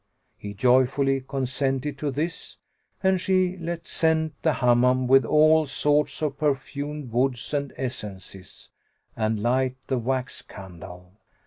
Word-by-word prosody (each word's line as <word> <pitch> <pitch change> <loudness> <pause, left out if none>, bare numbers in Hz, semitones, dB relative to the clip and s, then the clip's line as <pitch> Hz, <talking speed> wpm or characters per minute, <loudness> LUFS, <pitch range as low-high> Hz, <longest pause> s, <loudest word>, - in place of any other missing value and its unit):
He 100 0 -8
joyfully 130 +4 +3
consented 135 +1 -2
to 150 - -1
this, 155 +6 -4 0.5
and 190 -1 +2
she 185 -1 +1
let 170 -1 -5
scent 160 -1 +1
the 160 - +2
Hammam 125 +1 +3
with 135 0 +5
all 155 +3 +4
sorts 150 +2 +1
of 145 -2 -2
perfumed 145 -1 -2
woods 125 +2 0
and 140 -2 -1
essences, 100 -7 -7 0.5
and 110 -1 -1
light 130 +2 +1
the 130 - -1
wax 125 +1 -2
candles. 90 -2 -12
135 Hz, 125 wpm, -25 LUFS, 125-150 Hz, 0.5 s, with